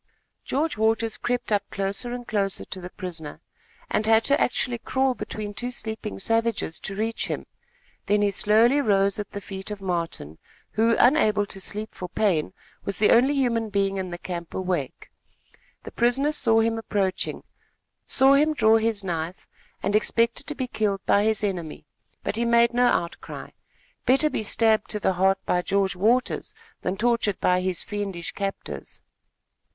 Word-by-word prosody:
George 295 -4 -1
Waters 225 0 +1
crept 240 +1 -2
up 205 -1 +3
closer 200 +5 -2
and 245 0 -6
closer 200 -3 -1
to 190 - -7
the 180 - -7
prisoner, 170 -6 -7 0.5
and 215 - 0
had 225 0 +5
to 280 +4 +2
actually 245 -1 0
crawl 265 +2 +1
between 210 -4 -6
two 245 +4 -3
sleeping 220 -3 -5
savages, 225 -5 0
to 195 - -6
reach 220 +2 -1
him; - - -4 0.6
then 205 0 +3
he 205 - +2
slowly 225 +8 +4
rose 200 -4 +2
at 205 - -4
the 200 - -6
feet 195 0 -7
of 210 -1 -5
Martin, 170 - -4 0.3
who, 230 +1 +3
unable 215 -7 +4
to 195 -1 -7
sleep 210 +3 -4
for 180 - -7
pain, 180 -6 +1 0.3
was 200 -2 -3
the 210 - +4
only 260 +5 +5
human 230 -5 +1
being 195 -1 0
in 185 -1 -3
the 175 - -5
camp 170 -1 -6
awake. 180 -7 -3 0.7
The - - -8
prisoner 255 +5 +2
saw 225 -6 +3
him 225 0 0
approaching, 195 -4 -2 0.6
saw 270 +1 +5
him 305 +2 +3
draw 220 -3 +5
his 220 -2 0
knife, 170 -1 -4 0.4
and 200 - +1
expected 230 +4 +1
to 295 - -4
be 260 - -2
killed 210 -5 -1
by 205 +1 +3
his 220 -1 +1
enemy; 175 -8 -3 0.4
but - - -1
he 235 - +1
made 235 0 +4
no 245 +1 +4
outcry. 170 -7 -2 0.6
Better 275 +4 +4
be - - -1
stabbed 220 0 +2
to 210 - -1
the 190 - +1
heart 190 +2 +3
by 180 - +1
George 195 +1 0
Waters 245 - +1 0.3
than 185 +2 -2
tortured 230 -3 +1
by 180 0 +2
his 185 -1 -2
fiendish 195 -5 -4
captors. 200 -1 -6
210 Hz, 170 wpm, -25 LUFS, 195-235 Hz, 0.7 s, had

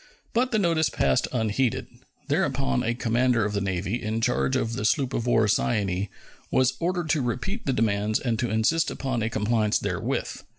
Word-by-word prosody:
But 250 +2 +2
the 225 - +1
notice 165 -5 +2
passed 65 -1 +1
unheeded. 115 0 0 0.4
Thereupon 65 -1 +1
a 120 +2 -1
commander 120 -1 +2
of 105 - -2
the 100 - 0
Navy, 95 +4 -2
in 110 0 -2
charge 125 +2 +1
of 115 -3 0
the 115 - -3
sloop 135 +3 +1
of 120 - -2
war 115 -2 +3
Cyane, 100 -2 0 0.4
was 130 0 +3
ordered 175 -2 -1
to 150 - +2
repeat 130 - -3
the - - +3
demands 105 -1 +1
and 115 -4 -1
to 120 - 0
insist 110 +10 +2
upon 130 -4 -2
a 110 - 0
compliance 110 0 +1
therewith. - - -3
115 Hz, 180 wpm, -26 LUFS, 105-130 Hz, 0.4 s, war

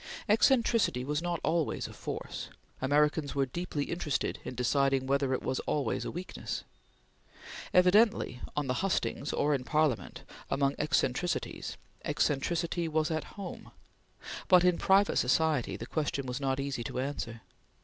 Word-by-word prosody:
Eccentricity 225 - +3
was 150 +3 -1
not 175 -1 -1
always 165 -3 0
a - - -10
force; - - -6 0.3
Americans 145 +1 +2
were 135 -1 +2
deeply 150 +2 -3
interested 155 -3 -2
in 125 - -6
deciding 135 +2 +2
whether 140 0 +1
it 130 - -1
was 130 - -1
always 140 -7 0
a - - -2
weakness. 180 +2 -5 1.1
Evidently, 180 - +4 0.2
on 150 - +1
the 125 - 0
hustings 190 -6 -1
or 150 - +1
in 135 -3 -1
Parliament, 150 -3 0 0.3
among 140 0 +2
eccentricities, 150 +2 -1 0.3
eccentricity 155 +4 0
was 155 0 0
at 160 +4 -4
home; 195 -3 -7 0.8
but 180 -1 +7
in 180 -1 +3
private 195 +1 +4
society 150 +1 +2
the 115 - -6
question 145 -1 -2
was 125 +1 -3
not 135 0 0
easy 140 -3 -2
to - - -5
answer. 125 -4 -4
145 Hz, 140 wpm, -31 LUFS, 135-170 Hz, 1.1 s, but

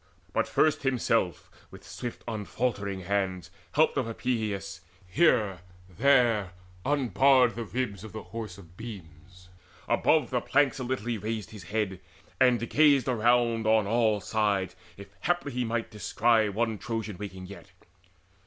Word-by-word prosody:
But - - +1
first 155 - +2
himself 115 -8 0 0.2
with - - -13
swift 120 -1 -7
unfaltering 105 -3 -2
hands, 95 -2 -2 0.2
Helped 155 0 +3
of 130 -4 0
Epeius, 110 -7 -3 0.2
here 105 - +2 0.3
and 90 - -20
there 120 -8 +3 0.3
unbarred 135 -2 +3
The 120 - -4
ribs 110 -5 -3
of 110 - -9
the 110 - -7
Horse 110 -5 -7
of 85 -3 -15
beams: 90 -4 -11 0.4
above 155 -2 +2
the 125 -1 +1
planks 140 0 +2
A - - -3
little 125 -3 -3
he 120 -2 -2
raised 110 0 -4
his 105 -5 -10
head, 100 -1 -2 0.4
and 125 -3 +3
gazed 145 -4 +4
around 120 -1 +2
On 110 -1 +4
all 110 0 +2
sides, 100 -3 0 0.2
if 100 - -9
he - - -30
haply 145 -7 -1
might 115 -1 -2
descry 110 +1 +2
One 110 +1 -1
Trojan 110 -4 -4
waking 95 -3 -7
yet. 90 -2 -11
110 Hz, 145 wpm, -28 LUFS, 100-125 Hz, 0.4 s, gazed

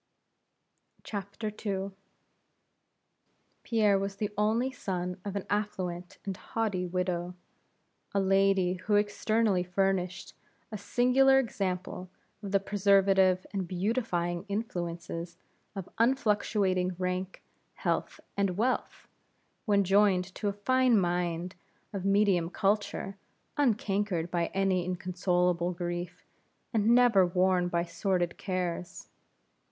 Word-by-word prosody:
II. 200 -1 -4 1.7
Pierre 210 -4 +2
was 195 0 -3
the 210 +1 -3
only 220 +5 +1
son 180 -7 -4
of 200 -1 -5
an 200 - -3
affluent, 185 -4 -3
and 195 -1 -3
haughty 200 -4 -2
widow; 180 0 -2 0.8
a 200 - +1
lady 195 -1 +3
who 195 +3 -1
externally 205 -1 +2
furnished 180 0 -1 0.4
a - - -4
singular 250 +6 +4
example 185 -6 -2 0.3
of 200 -2 -6
the 200 - +4
preservative 195 -2 +3
and 190 -3 -2
beautifying 180 -3 -1
influences 175 -4 -4 0.4
of 195 -2 -5
unfluctuating 205 -7 +1
rank, 185 +1 -3 0.3
health, - - -2 0.2
and 195 -2 0
wealth, 250 +4 -1 0.6
when 200 -3 +3
joined 190 -1 +3
to 210 - -3
a 200 - 0
fine 255 -3 +4
mind 175 0 -1 0.4
of 195 -2 -4
medium 195 -4 +3
culture, 200 0 -1 0.4
uncankered 205 - 0
by 170 -1 0
any 195 -2 +1
inconsolable 180 -1 0
grief, 175 0 -5 0.5
and 220 -1 +2
never 240 -6 +6
worn 180 0 +2
by 170 -1 0
sordid 175 0 -1
cares. 180 -2 -3
195 Hz, 105 wpm, -29 LUFS, 180-205 Hz, 1.7 s, never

